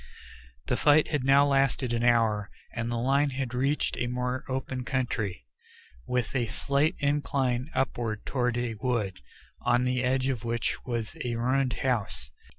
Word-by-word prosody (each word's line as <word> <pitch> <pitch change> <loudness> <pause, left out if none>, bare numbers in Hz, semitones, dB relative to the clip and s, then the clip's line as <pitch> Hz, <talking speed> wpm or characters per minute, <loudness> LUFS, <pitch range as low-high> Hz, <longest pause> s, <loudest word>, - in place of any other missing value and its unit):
The - - 0
fight 150 +1 +5
had 150 -4 0
now 140 +2 +6
lasted 135 -3 +2
an 120 0 0
hour, 115 -4 +3 0.2
and 115 0 -2
the 120 - -1
line 135 +4 +2
had 130 -2 -3
reached 135 +4 0
a 120 - 0
more 125 +1 -2
open 130 -1 -3
country, 115 - -2 0.6
with 125 0 -1
a 120 -3 +1
slight 140 +6 +1
incline 140 -2 0
upward 120 -4 -1
toward 125 -2 0
a 120 -1 -1
wood, 110 -4 -2 0.4
on 120 0 +2
the 125 0 0
edge 130 +1 +1
of 130 -4 -1
which 115 -1 -2
was 115 -3 -3
a 120 -1 -2
ruined 125 +2 +1
house. 105 - -1
125 Hz, 155 wpm, -28 LUFS, 115-135 Hz, 0.6 s, now